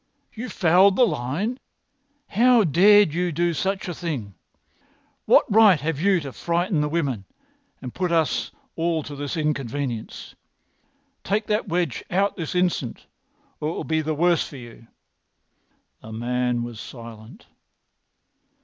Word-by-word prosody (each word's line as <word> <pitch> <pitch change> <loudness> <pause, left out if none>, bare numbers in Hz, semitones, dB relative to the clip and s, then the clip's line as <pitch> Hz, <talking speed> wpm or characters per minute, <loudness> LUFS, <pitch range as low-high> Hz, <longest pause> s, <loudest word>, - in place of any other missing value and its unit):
"You 235 +2 -6
fouled 185 +1 +4
the 250 - +5
line! 175 - -2 0.7
How 240 +2 +4
dared 195 +2 +5
you 175 +1 -1
do 170 +2 0
such 190 +6 -2
a 175 - -3
thing! 140 - -5 0.9
What - - +5
right 210 -5 +5
have 150 0 -2
you 195 -1 +3
to 135 -3 -7
frighten 170 -1 0
the 150 - -1
women 140 -11 -2 0.6
and 125 - -6
put 180 -2 -2
us 165 -2 +1 0.3
all 165 -1 -1
to 145 - -8
this 145 +4 -4
inconvenience? 140 -5 -3 0.9
Take 210 +3 -1
that 210 +1 -1
wedge 170 -6 -1
out 195 +2 +1
this 165 -1 -5
instant, 180 -9 -1 0.5
or 150 - -2
it - - -3
will - - -4
be 160 0 0
the 155 0 -2
worse 170 +2 +2
for 140 - -10
you." 120 -2 -13 1.1
The 110 - -11
man 120 +1 -1
was 120 -2 -7
silent. 115 - -11
165 Hz, 140 wpm, -23 LUFS, 135-190 Hz, 1.1 s, the